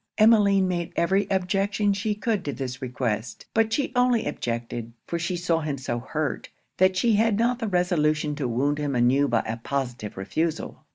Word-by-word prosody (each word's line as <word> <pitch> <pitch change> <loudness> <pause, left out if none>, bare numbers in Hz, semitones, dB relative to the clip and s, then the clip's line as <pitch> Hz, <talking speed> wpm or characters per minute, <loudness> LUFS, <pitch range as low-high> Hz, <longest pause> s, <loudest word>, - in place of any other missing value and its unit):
Emmeline 205 -3 +5
made 175 -2 -2
every 190 +4 +2
objection 195 +2 +1
she 210 +1 -1
could 210 -2 -1
to 145 - -2
this 130 -2 -5
request. 120 -3 -3
But 225 0 +2
she 275 +3 0
only 245 -2 +3
objected; 115 0 -4
for 170 - -3
she 175 +2 -2
saw 170 -1 +1
him 150 -3 -3
so 120 -2 -3
hurt, 150 +5 -3 0.3
that 185 0 +3
she 230 +3 +3
had 220 -1 +3
not 240 +2 +1
the 225 - -2
resolution 155 -5 +1
to 140 -5 -1
wound 140 +5 0
him 145 -2 -1
anew 130 +4 +3
by 120 -3 +2
a 110 +1 -4
positive 125 -4 -4
refusal. 160 - -3
170 Hz, 180 wpm, -25 LUFS, 130-200 Hz, 0.3 s, Emmeline